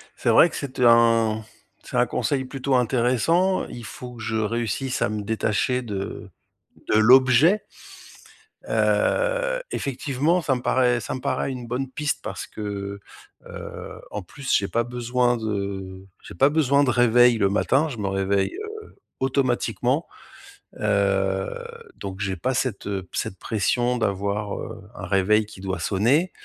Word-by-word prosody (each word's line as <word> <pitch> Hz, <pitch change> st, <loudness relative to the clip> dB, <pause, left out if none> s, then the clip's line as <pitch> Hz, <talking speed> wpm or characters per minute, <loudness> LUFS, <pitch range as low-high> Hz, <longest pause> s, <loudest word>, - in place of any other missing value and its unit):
C'est -, -, -1 dB
vrai 170 Hz, -, +7 dB
que -, -, -9 dB
c'est 130 Hz, -3 st, -6 dB
un 115 Hz, -2 st, +4 dB, 0.4 s
c'est -, -, -5 dB
un -, -, +4 dB
conseil 135 Hz, -2 st, -1 dB
plutôt 135 Hz, 0 st, -1 dB
intéressant, 130 Hz, -, +2 dB
il 120 Hz, -2 st, -9 dB
faut 125 Hz, -1 st, -9 dB
que 115 Hz, -, -10 dB
je 110 Hz, 0 st, -3 dB
réussisse 115 Hz, +4 st, -1 dB
à -, -, +2 dB
me 105 Hz, 0 st, -3 dB
détacher 110 Hz, +3 st, 0 dB
de 100 Hz, -4 st, -5 dB, 0.6 s
de -, -, +5 dB
l'objet. 130 Hz, -, +6 dB, 1.1 s
Heu, -, -, +1 dB
effectivement 145 Hz, -, 0 dB
ça 135 Hz, -3 st, +1 dB
me -, -, -5 dB
paraît 125 Hz, -1 st, +2 dB
ça 100 Hz, -, -5 dB
me 130 Hz, -, -5 dB
paraît 135 Hz, -, -1 dB
une 125 Hz, -2 st, -7 dB
bonne 130 Hz, +2 st, -2 dB
piste 150 Hz, +3 st, -2 dB
parce -, -, -5 dB
que, 100 Hz, -1 st, -5 dB, 0.5 s
heu, -, -, -8 dB
en 105 Hz, -, -5 dB
plus 135 Hz, +9 st, -5 dB
j'ai 100 Hz, -, +2 dB
pas 115 Hz, -, +1 dB
besoin 120 Hz, 0 st, 0 dB
de 100 Hz, -3 st, -4 dB, 0.2 s
j'ai -, -, -10 dB
pas 135 Hz, -, +4 dB
besoin 145 Hz, -2 st, +3 dB
de 130 Hz, -, +2 dB
réveil 120 Hz, 0 st, +5 dB
le 100 Hz, -2 st, +3 dB
matin. 135 Hz, +9 st, +2 dB
Je 120 Hz, -7 st, -7 dB
me 100 Hz, -, -1 dB
réveille, 95 Hz, 0 st, 0 dB
heu, 430 Hz, +1 st, -7 dB, 0.4 s
automatiquement, 130 Hz, -2 st, 0 dB, 0.7 s
heu, 100 Hz, -2 st, +1 dB, 0.5 s
donc 95 Hz, -1 st, -7 dB
j'ai 95 Hz, -2 st, -1 dB
pas 130 Hz, +1 st, -1 dB
cette, 120 Hz, -6 st, -2 dB
heu, 95 Hz, -2 st, -3 dB
cette 95 Hz, -, -3 dB
pression 120 Hz, +3 st, 0 dB
d'avoir, 100 Hz, -1 st, -1 dB
heu, -, -, -7 dB
un -, -, -6 dB
réveil 105 Hz, +3 st, +2 dB
qui 105 Hz, -2 st, -13 dB
doit 95 Hz, 0 st, -3 dB
sonner. 130 Hz, -, +2 dB
120 Hz, 155 wpm, -24 LUFS, 100-130 Hz, 1.1 s, vrai